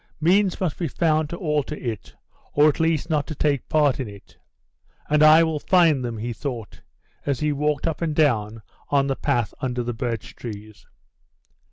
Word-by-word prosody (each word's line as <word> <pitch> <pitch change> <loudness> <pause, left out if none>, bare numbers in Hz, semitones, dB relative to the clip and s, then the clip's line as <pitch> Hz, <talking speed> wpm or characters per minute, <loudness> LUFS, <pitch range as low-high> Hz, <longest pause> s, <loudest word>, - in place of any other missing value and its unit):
Means 185 +4 +2
must 180 -6 -2
be 170 - -1
found 155 0 +1
to 170 - -5
alter 150 -4 -1
it, 115 -8 -6 0.4
or 145 +1 +5
at 150 - +1
least 160 -1 +1
not 150 -2 0
to 155 - -5
take 140 -3 0
part 145 -4 +2
in 130 - -3
it. 100 -1 -13 0.8
"And 150 0 +4
I 155 +2 +8
will 160 -2 -1
find 165 -6 +3
them," 120 -2 -4
he 115 +2 -4
thought, 120 -4 -6 0.4
as 140 -3 -1
he 150 0 0
walked 150 0 -1
up 165 -1 -2
and 160 -3 -1
down 115 -8 +1 0.3
the 140 -1 +2
path 120 -7 -1
under 125 -2 -2
the 120 0 -3
birch 115 -1 -4
trees. 105 -3 -9
145 Hz, 180 wpm, -23 LUFS, 120-155 Hz, 0.8 s, I